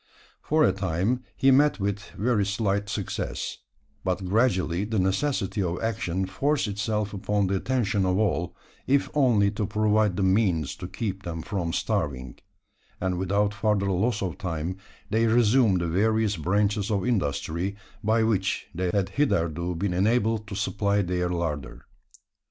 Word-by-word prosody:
For 155 Hz, +1 st, +2 dB
a -, -, +5 dB
time, 95 Hz, +6 st, -1 dB, 0.2 s
he 135 Hz, -, +5 dB
met 145 Hz, +1 st, +4 dB
with 100 Hz, +1 st, -1 dB, 0.2 s
very 110 Hz, -1 st, +2 dB
slight 100 Hz, 0 st, -1 dB
success; -, -, -3 dB, 0.4 s
but 95 Hz, 0 st, -1 dB
gradually 95 Hz, -3 st, +1 dB
the 110 Hz, +1 st, -2 dB
necessity 100 Hz, +2 st, 0 dB
of 90 Hz, -1 st, -1 dB
action 95 Hz, -5 st, -1 dB
forced 140 Hz, +9 st, 0 dB
itself 105 Hz, 0 st, -2 dB
upon 100 Hz, +1 st, 0 dB
the 95 Hz, +1 st, 0 dB
attention 110 Hz, -3 st, 0 dB
of 90 Hz, 0 st, +1 dB
all 90 Hz, -4 st, 0 dB, 0.3 s
if 140 Hz, +1 st, +2 dB
only 115 Hz, -9 st, +3 dB
to 105 Hz, -1 st, -2 dB
provide 105 Hz, -2 st, +2 dB
the 100 Hz, -, +1 dB
means 95 Hz, -7 st, +2 dB
to 90 Hz, -, -6 dB
keep 95 Hz, 0 st, -4 dB
them 85 Hz, -4 st, -5 dB
from 90 Hz, -5 st, -2 dB
starving; 65 Hz, -6 st, -2 dB, 0.6 s
and 90 Hz, -1 st, -1 dB
without 100 Hz, +2 st, +1 dB
further 100 Hz, -1 st, +1 dB
loss 105 Hz, +4 st, 0 dB
of 90 Hz, -4 st, -4 dB
time, 85 Hz, 0 st, -3 dB, 0.3 s
they 115 Hz, +2 st, +3 dB
resumed 110 Hz, -4 st, +4 dB
the 85 Hz, -, -1 dB
various 110 Hz, +4 st, +2 dB
branches 100 Hz, +5 st, 0 dB
of 100 Hz, -1 st, 0 dB
industry, 90 Hz, -, -1 dB, 0.3 s
by 110 Hz, +2 st, +3 dB
which 100 Hz, -3 st, 0 dB
they 90 Hz, +1 st, -1 dB
had 100 Hz, -1 st, 0 dB
hitherto 85 Hz, -, 0 dB
been 90 Hz, +2 st, -1 dB
enabled 110 Hz, +3 st, +1 dB
to 100 Hz, -, -6 dB
supply 100 Hz, 0 st, 0 dB
their 90 Hz, -1 st, -1 dB
larder. 75 Hz, -7 st, -3 dB
100 Hz, 150 wpm, -26 LUFS, 90-110 Hz, 0.6 s, a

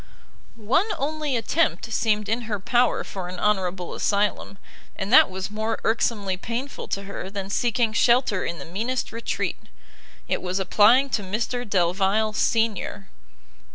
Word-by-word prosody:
One 235 Hz, -, +1 dB
only 295 Hz, -2 st, -1 dB
attempt 225 Hz, -, 0 dB
seemed 210 Hz, -2 st, +1 dB
in 225 Hz, +3 st, 0 dB
her 205 Hz, -2 st, -1 dB
power 240 Hz, +5 st, +2 dB
for 185 Hz, -2 st, -6 dB
an 180 Hz, 0 st, -7 dB
honourable 190 Hz, -4 st, 0 dB
asylum, 205 Hz, -1 st, -1 dB, 0.4 s
and 195 Hz, +4 st, -3 dB
that 260 Hz, -, +8 dB
was 190 Hz, +1 st, -5 dB
more 220 Hz, +1 st, -2 dB
irksomely 210 Hz, -4 st, 0 dB
painful 240 Hz, +8 st, -5 dB
to 200 Hz, -, -3 dB
her 195 Hz, -1 st, -6 dB
than 195 Hz, 0 st, -5 dB
seeking 235 Hz, 0 st, +1 dB
shelter 235 Hz, -4 st, +3 dB
in 170 Hz, -, -3 dB
the 140 Hz, -, -8 dB
meanest 230 Hz, +9 st, -3 dB
retreat: 230 Hz, +1 st, -3 dB, 0.7 s
it -, -, -1 dB
was 185 Hz, 0 st, -2 dB
applying 220 Hz, +8 st, +4 dB
to 220 Hz, -, 0 dB
Mr 220 Hz, +4 st, -3 dB
Delvile 195 Hz, +4 st, +1 dB
senior. 220 Hz, -3 st, 0 dB
210 Hz, 145 wpm, -24 LUFS, 195-235 Hz, 0.7 s, that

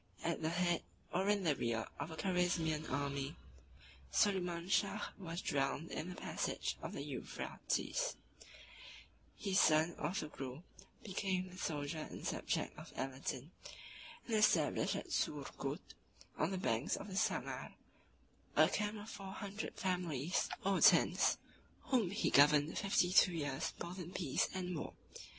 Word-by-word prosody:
At 170 Hz, 0 st, -1 dB
the 160 Hz, -, +1 dB
head, 175 Hz, 0 st, +1 dB, 0.3 s
or 190 Hz, +3 st, +2 dB
in 205 Hz, -2 st, +3 dB
the 155 Hz, -5 st, +3 dB
rear, 115 Hz, -3 st, -1 dB
of -, -, -3 dB
a 160 Hz, -, -6 dB
Carizmian 175 Hz, -4 st, +1 dB
army, 140 Hz, 0 st, -2 dB, 0.8 s
Soliman 180 Hz, -4 st, +2 dB
Shah 200 Hz, +2 st, +1 dB
was 170 Hz, -1 st, -5 dB
drowned 140 Hz, +3 st, 0 dB
in 170 Hz, -, -3 dB
the 180 Hz, -, -6 dB
passage -, -, -2 dB
of -, -, -5 dB
the -, -, -4 dB
Euphrates: -, -, -2 dB, 1.2 s
his 195 Hz, -1 st, +2 dB
son 160 Hz, +2 st, +5 dB
Orthogrul 150 Hz, -5 st, -3 dB, 0.4 s
became 185 Hz, -2 st, -1 dB
the 185 Hz, -, -11 dB
soldier 150 Hz, -1 st, -2 dB
and -, -, -8 dB
subject -, -, -1 dB
of -, -, -10 dB
Aladin, 135 Hz, +2 st, -4 dB, 0.7 s
and 230 Hz, -, 0 dB
established 215 Hz, 0 st, +3 dB
at -, -, -5 dB
Surgut, -, -, -2 dB, 0.4 s
on -, -, +1 dB
the 190 Hz, -, -2 dB
banks 125 Hz, -, +1 dB
of 200 Hz, -, -7 dB
the 190 Hz, -, -6 dB
Sangar, -, -, -1 dB, 0.8 s
a -, -, +7 dB
camp 210 Hz, +1 st, -1 dB
of 205 Hz, +1 st, -8 dB
four 195 Hz, -3 st, -7 dB
hundred 205 Hz, +1 st, -5 dB
families 175 Hz, -4 st, 0 dB, 0.2 s
or 195 Hz, -1 st, +2 dB
tents, -, -, +6 dB, 0.5 s
whom 235 Hz, -9 st, +4 dB
he 200 Hz, -, 0 dB
governed 145 Hz, +2 st, +6 dB
fifty 190 Hz, -3 st, +2 dB
two 185 Hz, -1 st, +7 dB
years 145 Hz, -5 st, -2 dB
both 180 Hz, +2 st, -6 dB
in 175 Hz, -1 st, -6 dB
peace 160 Hz, -8 st, +1 dB
and 180 Hz, -1 st, -3 dB
war. 155 Hz, -, -4 dB
175 Hz, 140 wpm, -37 LUFS, 150-195 Hz, 1.2 s, a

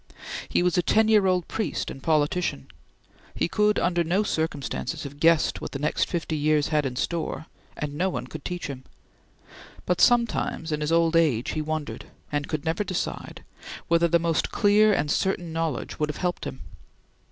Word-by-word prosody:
He -, -, +2 dB
was 180 Hz, 0 st, +2 dB
a -, -, +4 dB
ten 220 Hz, +5 st, +3 dB
year 210 Hz, -3 st, +5 dB
old 180 Hz, -2 st, +1 dB
priest 220 Hz, -, -2 dB
and 135 Hz, -, -9 dB
politician. 155 Hz, -, 0 dB, 0.7 s
He -, -, +1 dB
could 210 Hz, +3 st, +2 dB
under 175 Hz, -1 st, +1 dB
no 180 Hz, +6 st, +1 dB
circumstances 160 Hz, -2 st, -2 dB
have 145 Hz, 0 st, -9 dB
guessed 165 Hz, 0 st, +3 dB
what -, -, -6 dB
the -, -, -2 dB
next 150 Hz, +2 st, 0 dB
fifty 170 Hz, -2 st, -2 dB
years 150 Hz, 0 st, +2 dB
had 150 Hz, -3 st, +1 dB
in 125 Hz, -, -6 dB
store, 165 Hz, +3 st, -2 dB, 0.3 s
and 150 Hz, -1 st, -4 dB
no 180 Hz, +6 st, 0 dB
one -, -, -4 dB
could -, -, -9 dB
teach 180 Hz, 0 st, -4 dB
him; 135 Hz, -2 st, -6 dB, 1.0 s
but 180 Hz, -, +1 dB
sometimes, 235 Hz, -8 st, +2 dB
in 150 Hz, 0 st, -1 dB
his 150 Hz, +1 st, -1 dB
old 165 Hz, 0 st, +3 dB
age, 145 Hz, -9 st, +2 dB
he 155 Hz, -, -2 dB
wondered 155 Hz, -1 st, -4 dB, 0.3 s
and 145 Hz, -1 st, -1 dB
could 155 Hz, -2 st, -3 dB
never 165 Hz, +5 st, 0 dB
decide 185 Hz, -3 st, -4 dB, 0.5 s
whether 170 Hz, 0 st, +4 dB
the 170 Hz, +1 st, +4 dB
most 165 Hz, -1 st, 0 dB
clear 210 Hz, +1 st, +4 dB
and 150 Hz, -7 st, +1 dB
certain 175 Hz, -3 st, -1 dB
knowledge 165 Hz, -4 st, -3 dB
would 150 Hz, 0 st, 0 dB
have 150 Hz, -, -4 dB
helped 180 Hz, -1 st, -2 dB
him. -, -, -6 dB
165 Hz, 185 wpm, -25 LUFS, 150-180 Hz, 1.0 s, year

